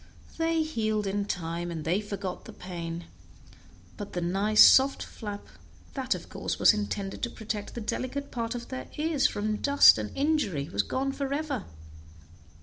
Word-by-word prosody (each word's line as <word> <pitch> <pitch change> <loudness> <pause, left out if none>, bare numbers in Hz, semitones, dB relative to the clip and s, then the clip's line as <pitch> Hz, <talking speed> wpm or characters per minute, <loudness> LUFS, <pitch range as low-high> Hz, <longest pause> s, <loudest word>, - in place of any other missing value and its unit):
They 325 0 +2
healed 215 -8 -1
in 200 +1 -1
time, 170 -2 -3
and 160 -3 -5
they 180 +6 +1
forgot 200 -3 -5
the - - -10
pain, 170 -2 -6 0.9
but 205 -1 -7
the 175 - -1
nice 195 +5 +5
soft 270 +1 +5
flap, 205 -2 -7 0.5
that 265 -1 -1
of - - -9
course - - -4
was - - +6
intended 205 -2 -3
to 240 - -1
protect 215 -2 -5
the 235 - -4
delicate 265 +6 -3
part 230 0 -3
of 240 0 -7
their 260 - -6
ears 305 -2 +2
from 215 +1 -2
dust 280 - +6
and 105 -1 -3
injury, 275 - 0
was 100 - +1
gone 270 - -2
forever. 280 -3 -3
215 Hz, 160 wpm, -28 LUFS, 190-270 Hz, 0.9 s, was